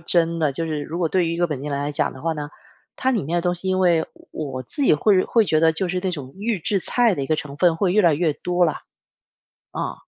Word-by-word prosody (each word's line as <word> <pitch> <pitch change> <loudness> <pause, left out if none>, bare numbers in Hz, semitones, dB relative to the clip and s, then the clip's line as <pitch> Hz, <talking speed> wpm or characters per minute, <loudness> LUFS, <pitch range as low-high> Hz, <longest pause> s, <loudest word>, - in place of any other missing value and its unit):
真 165 0 +1
的， 155 -3 +1
就 165 +5 -3
是 155 -2 -3
如 165 +3 -5
果 170 -2 +1
对 180 +1 +1
于 165 - -1
一 - - -5
个 175 - +2
本 145 -5 -5
地 150 - -4
人 140 - -1
来 145 +1 -2
讲 150 - 0
的 130 - -12
话 165 +2 -1
呢， 150 -1 -5 0.4
它 260 - 0
里 230 -7 0
面 165 +5 -2
的 - - +2
东 175 0 0
西 185 +2 -2
因 185 - +1
为 175 -3 +3 0.3
我 135 -4 -5
自 285 - -4
己 - - +5
会 185 +5 +3
会 225 -3 +2
觉 155 - +2
得 160 0 +4
就 180 +3 -2
是 180 +1 -1
那 190 - 0
种 140 -6 -7
预 210 +1 -1
制 195 +4 0
菜 235 +3 +2
的 140 - -3
一 - - -3
个 155 - +1
成 150 -2 -6
分 175 -1 +3
会 185 +2 +1
越 210 - +5
来 170 -3 +5
越 155 -1 0
多 180 +2 +1
了。 155 - -1 1.0
嗯。 - - -2
165 Hz, 310 characters per minute, -22 LUFS, 150-185 Hz, 1.0 s, 己